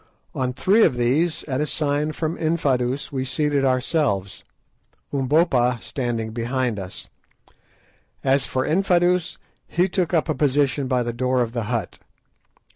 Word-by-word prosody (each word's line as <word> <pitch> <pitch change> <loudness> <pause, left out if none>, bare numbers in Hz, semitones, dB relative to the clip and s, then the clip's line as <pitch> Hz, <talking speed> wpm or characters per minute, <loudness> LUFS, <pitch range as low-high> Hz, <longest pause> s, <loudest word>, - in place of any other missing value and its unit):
On 130 -1 -1
three 195 - +3
of - - +3
these, 145 +8 +1
at 135 -1 -2
a 150 - 0
sign 150 +1 0
from 160 +1 -3
Infadoos, 140 -5 0
we 130 -2 -2
seated 145 +1 0
ourselves, 130 - 0 0.7
Umbopa 135 -3 +2
standing 115 -4 -3
behind 120 -1 -1
us. 95 -1 -8 1.2
As 135 0 +2
for 130 0 -1
Infadoos, 180 0 +2 0.3
he 180 +2 +1
took 185 -2 -1
up 165 -2 +1
a 155 - +1
position 145 -1 +1
by 125 -1 +1
the 120 0 -3
door 125 +1 +1
of 115 - -5
the 120 -2 -3
hut. 115 -3 -3
135 Hz, 140 wpm, -23 LUFS, 125-155 Hz, 1.2 s, three